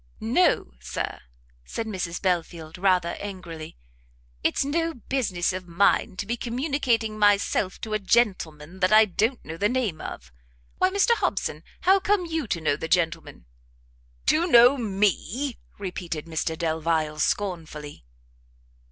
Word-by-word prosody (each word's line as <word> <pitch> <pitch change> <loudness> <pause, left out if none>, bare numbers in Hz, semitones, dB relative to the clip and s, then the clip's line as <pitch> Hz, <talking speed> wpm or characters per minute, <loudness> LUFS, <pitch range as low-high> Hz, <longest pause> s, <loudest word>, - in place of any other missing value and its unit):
"No, 60 - +2
Sir," - - -4 0.4
said 225 - -4
Mrs 185 -5 -3
Belfield, 170 -3 -2
rather 180 -3 +3
angrily, 170 - -7 0.7
"it's - - +1
no 330 +3 -1
business 210 -8 -1
of 185 -1 -6
mine 185 +1 +2
to 205 - -3
be 235 +3 -1
communicating 240 -3 -1
myself 205 -2 +2
to 220 - -4
a 215 - +1
gentleman 185 -6 0
that 185 - +2
I 215 +1 +8
don't 220 +6 -1
know 160 - -6
the 205 +4 +2
name 235 -10 -1
of. - - -8 0.5
Why, 370 - +4
Mr 400 +5 +2
Hobson, - - -2 0.2
how 385 +1 +5
come 390 -1 +1
you 320 -5 -2
to 170 - -1
know 155 -3 +1
the 160 - -5
gentleman?" 165 - -1 0.8
"To 335 +3 +3
know 245 -3 +7
me!" 220 - -1 0.2
repeated 180 -5 -5
Mr 160 0 -2
Delvile, 160 -1 -1
scornfully. 160 - -2
195 Hz, 135 wpm, -25 LUFS, 165-240 Hz, 0.8 s, I